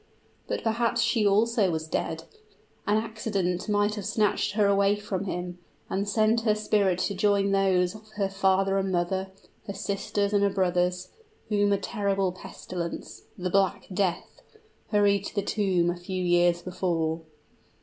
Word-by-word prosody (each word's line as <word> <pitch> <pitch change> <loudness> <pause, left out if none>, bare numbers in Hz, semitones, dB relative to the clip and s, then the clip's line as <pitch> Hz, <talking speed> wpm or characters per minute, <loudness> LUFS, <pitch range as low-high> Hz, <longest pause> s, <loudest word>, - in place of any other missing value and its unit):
But - - -3
perhaps 230 +1 +1
she 230 -2 +2
also 215 0 +3
was 160 -1 -3
dead! 160 0 -2 0.6
An 210 +1 +3
accident 215 -4 -2
might 205 0 +2
have 205 -3 -5
snatched 210 -2 +1
her 210 -1 +3
away 200 0 +3
from 200 -2 -4
him, 180 -1 -4 0.3
and 200 +1 -1
sent 220 +2 +3
her 215 -2 +2
spirit 205 -4 +1
to 200 - 0
join 200 0 +2
those 190 -2 +2
of 215 0 -13
her 200 -2 0
father 195 0 +2
and 190 0 -1
mother, 190 +2 0 0.4
her 200 - -4
sisters 200 +1 -2
and 205 - +3
her 200 - +4
brothers, 180 -1 0 0.4
whom 205 -1 +2
a 200 - +3
terrible 195 -3 -1
pestilence 180 -1 -7
the 180 0 -3
Black 195 0 +1
Death 185 -2 -2 0.5
hurried 200 -2 +3
to - - -7
the 200 - 0
tomb 185 -5 +1
a - - -4
few 185 +1 -4
years 175 -1 +3
before. 170 -3 -1
195 Hz, 160 wpm, -27 LUFS, 180-205 Hz, 0.6 s, her